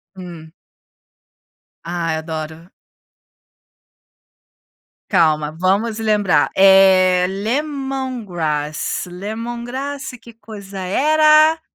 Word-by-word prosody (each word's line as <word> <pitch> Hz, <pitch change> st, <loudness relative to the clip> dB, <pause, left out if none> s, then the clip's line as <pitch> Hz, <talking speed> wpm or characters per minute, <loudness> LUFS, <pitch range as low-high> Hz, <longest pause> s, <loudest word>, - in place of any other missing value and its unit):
Hum. 170 Hz, -4 st, -11 dB, 1.3 s
Ai, 170 Hz, -1 st, -3 dB
adoro. 160 Hz, +1 st, -7 dB, 2.4 s
Calma, 155 Hz, -5 st, +2 dB
vamos 195 Hz, +7 st, -1 dB
lembrar. 210 Hz, -4 st, +1 dB
É, 190 Hz, -2 st, +5 dB
lemongrass, 215 Hz, -, -3 dB
lemongrass 240 Hz, +8 st, -6 dB
que 235 Hz, -, -14 dB
coisa 205 Hz, -3 st, -10 dB
era? 310 Hz, -, +3 dB
195 Hz, 60 wpm, -18 LUFS, 175-240 Hz, 2.4 s, É